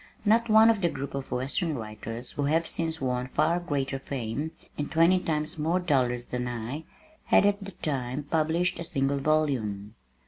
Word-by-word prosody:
Not 230 +2 +3
one 220 +1 +7
of 215 -3 -2
the 170 - +3
group 140 -2 -5
of 135 -1 -5
western 140 +6 -1
writers 115 +2 -7
who 145 - -2
have 160 +3 +2
since 160 -1 -2
won 125 -1 -1
far 155 +6 +2
greater 140 -5 -2
fame, 135 +2 -3 0.3
and 145 - -3
twenty 170 +3 +5
times 155 -3 -1
more 165 +4 +1
dollars 125 -8 +1
than 125 0 -3
I, 120 +6 -5 0.4
had - - +5
at 205 0 +2
that 195 -1 -11
time 135 -1 -2
published 160 +4 0
a - - -3
single 140 -3 0
volume. 130 -9 0
145 Hz, 175 wpm, -28 LUFS, 125-165 Hz, 0.4 s, one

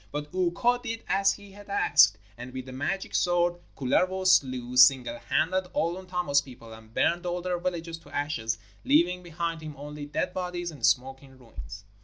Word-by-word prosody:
And 150 0 -2
Ukko 185 +7 +1
did 230 -2 -5
as 195 0 +3
he 200 -1 -13
had 205 +1 -14
asked, 105 - +5 0.2
and 120 +3 -9
with 130 -1 -6
the 130 - -9
magic 145 +9 -3
sword 175 0 +2 0.2
Kullervo 185 +8 +1
slew, 130 -8 +3
single 125 -1 +5
handed, 185 +3 0
all 175 -3 0
Untamo's 180 -6 0
people, 120 -4 -12
and 110 0 -14
burned 175 +9 +1
all 175 0 -1
their 180 -1 -1
villages 170 -2 -4
to 145 - -18
ashes, 140 -7 -2 0.3
leaving 175 +5 +3
behind 170 -1 -4
him 155 -1 -8
only 145 +1 -7
dead 150 +4 -2
bodies 180 -1 -3
and 150 - -13
smoking 135 +1 0
ruins. 105 -5 -11
165 Hz, 175 wpm, -27 LUFS, 130-180 Hz, 0.3 s, asked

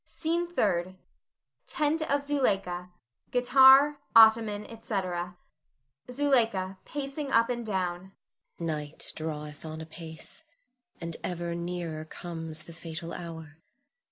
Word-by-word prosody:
SCENE 340 +2 -1
THIRD. 185 - +1 0.7
[Tent 305 +2 0
of 285 0 +1
Zuleika; 195 -11 0 0.4
guitar, 265 +3 +6 0.2
ottoman, 220 -2 +6
etc.] 180 -5 -4 0.7
Zuleika 230 -9 +1
[pacing 280 0 -4
up 230 0 +4
and 240 -1 -3
down]. 190 -3 -3 0.5
Night 155 -3 -3
draweth 150 -2 -5
on 160 0 -6
apace, 160 - -5 0.6
and 170 -1 -2
ever 175 -1 -3
nearer 170 -2 -4
comes 165 -1 -1
the 170 - -11
fatal 165 0 -6
hour. 160 -3 -8
180 Hz, 100 wpm, -28 LUFS, 165-245 Hz, 0.7 s, guitar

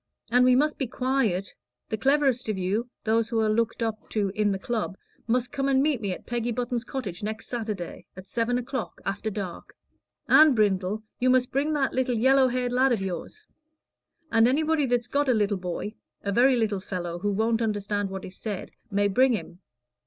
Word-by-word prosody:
And 250 +1 +5
we 250 0 +5
must 300 +3 +2
be 270 - -1
quiet. 250 -7 0 0.4
The - - 0
cleverest 265 0 +2
of 210 - -1
you 200 +6 -1
those 225 +1 +1
who 230 -1 0
are 215 -1 +2
looked 230 +1 0
up 220 -1 -4
to 205 -3 0
in 205 +1 +1
the 195 - -1
Club 210 -1 -3 0.3
must 250 +2 0
come 275 -1 -1
and 265 0 +3
meet 290 -6 +1
me 200 -3 -2
at 180 - -6
Peggy 240 0 -2
Button's 240 0 -2
cottage 205 -12 -5
next 215 +1 -4
Saturday, 215 -7 -5
at 185 +1 -10
seven 240 +3 0
o'clock, 250 -1 -4
after 200 +3 -2
dark. 195 -4 -6 0.5
And, 305 -3 +7
Brindle, 205 0 +1 0.2
you 255 - +3
must 255 -1 +3
bring 290 +3 0
that 275 -3 0
little 255 -1 +1
yellow 260 +3 +5
haired 250 0 -1
lad 255 +2 +3
of 235 - +2
yours. 195 - -6 0.9
And 225 0 +5
anybody 305 +2 +2
that's 240 -1 +1
got 280 +3 0
a 250 - +4
little 205 -2 +1
boy 180 +3 -4 0.3
a 200 - -1
very 250 +5 +5
little 215 -4 0
fellow, 175 -3 -4
who 205 +3 -1
won't 225 +3 +1
understand 205 -2 -1
what 190 0 -6
is 185 - -10
said 210 -4 -5 0.2
may 205 +1 +2
bring 255 +6 +4
him. 185 -5 -5
230 Hz, 195 wpm, -26 LUFS, 205-255 Hz, 0.9 s, And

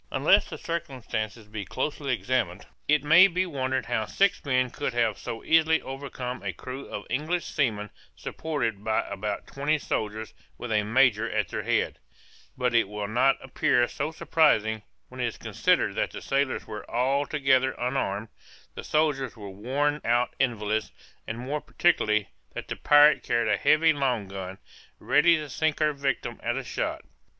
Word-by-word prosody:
Unless - - +3
the - - -6
circumstances 120 -9 -4
be 105 -1 -6
closely 145 +6 -3
examined, 120 -6 -1 0.2
it 150 -1 +3
may 165 +6 +8
be 185 0 0
wondered 130 -6 -2
how 110 -3 -1
six 200 -1 +1
men 130 -3 +1
could - - -3
have - - +2
so 115 - -6
easily 160 0 +4
overcome 130 -2 -6
a 100 -2 -3
crew 130 +8 -8
of 105 - -6
English 160 +5 -1
seamen 105 -8 -1 0.2
supported 115 -10 -3
by 110 0 0
about 100 +1 -4
twenty 145 +3 0
soldiers 110 -5 -3 0.2
with 120 - -6
a 105 -1 +3
major 115 0 +3
at - - -1
their - - -3
head: - - 0 0.6
but 125 -2 0
it 115 -4 +3
will 105 -1 -4
not 125 +5 +3
appear 135 -2 +2
so - - -3
surprising, 110 -10 +2 0.3
when - - -11
it - - +1
is - - -6
considered - - +1
that - - -1
the - - -8
sailors 135 -1 0
were 105 -2 -8
altogether 135 +1 +2
unarmed, 120 -4 -2 0.4
the - - -7
soldiers 145 -5 0
were 100 -2 -8
worn 140 +9 -1
out 120 +1 +1
invalids, 110 -4 0 0.4
and 115 - -4
more 140 +5 -3
particularly, 105 - +1 0.3
that - - -6
the - - -4
pirate 150 +1 +6
carried 115 -1 +1
a - - +4
heavy 160 +1 +4
long 125 -8 -1
gun, 95 -1 -7 0.4
ready 170 +2 +4
to 155 -2 -4
sink 155 +3 0
her 155 -1 +2
victim 135 -4 -2
at 120 +2 -1
a 135 - -3
shot. - - -3
130 Hz, 165 wpm, -27 LUFS, 110-145 Hz, 0.6 s, may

